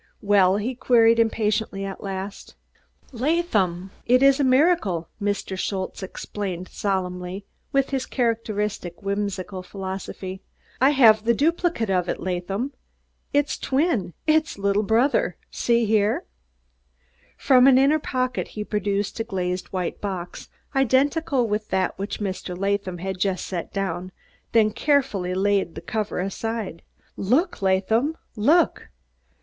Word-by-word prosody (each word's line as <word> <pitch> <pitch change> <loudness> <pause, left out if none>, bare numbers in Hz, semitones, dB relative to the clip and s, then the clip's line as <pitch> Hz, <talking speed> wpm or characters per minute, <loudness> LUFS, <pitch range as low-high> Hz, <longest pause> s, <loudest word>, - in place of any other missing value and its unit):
"Well?" 200 -2 +4
he 225 +5 -2
queried 230 -2 +4
impatiently, 215 -3 0
at 195 -1 -6
last. 195 0 -6 0.6
"Laadham, 225 - 0 0.2
id 250 +2 +5
is 275 -1 +6
der - - +3
miracle!" 260 - +3
Mr. 200 -1 -2
Schultze 190 0 -3
explained 190 -1 -5
solemnly, 185 -1 -3 0.3
with 275 0 +1
his 265 -2 -1
characteristic, 210 -7 -2
whimsical 200 -2 -3
philosophy. 190 0 -6 0.4
"I 265 - +6
haf 225 -7 +6
der 235 +1 +3
dupligade 325 - +1
of 180 -1 +1
id, - - -1
Laadham 190 +8 -3 0.6
der 290 0 +4 0.2
dwin, 265 - 0
der 315 0 +5 0.2
liddle 200 +1 +1
brudder. 230 +7 +2 0.2
Zee 235 -1 +2
here!" 215 0 +1 1.1
From 260 -2 +5
an 265 -2 +7
inner 280 +4 +4
pocket 255 -3 -2
he 210 - -5
produced 205 0 -2
a - - +1
glazed 185 -4 -3
white 185 -2 -4
box, 185 -4 -5 0.3
identical 270 0 +2
with 210 0 -2
that 190 0 0
which 200 +2 -4
Mr. 190 -3 -4
Latham 195 -1 -1
had 190 +1 -4
just 190 -1 0
set 175 -3 -5
down, 185 -2 -3 0.4
then 220 -2 +4
carefully 210 -10 +1
laid 195 -3 +1
the - - -5
cover 215 -3 -3
aside. 195 -1 -3 0.3
"Look, 255 - +1
Laadham, 220 - +1 0.2
look!" 300 +10 +2
205 Hz, 130 wpm, -24 LUFS, 190-250 Hz, 1.1 s, an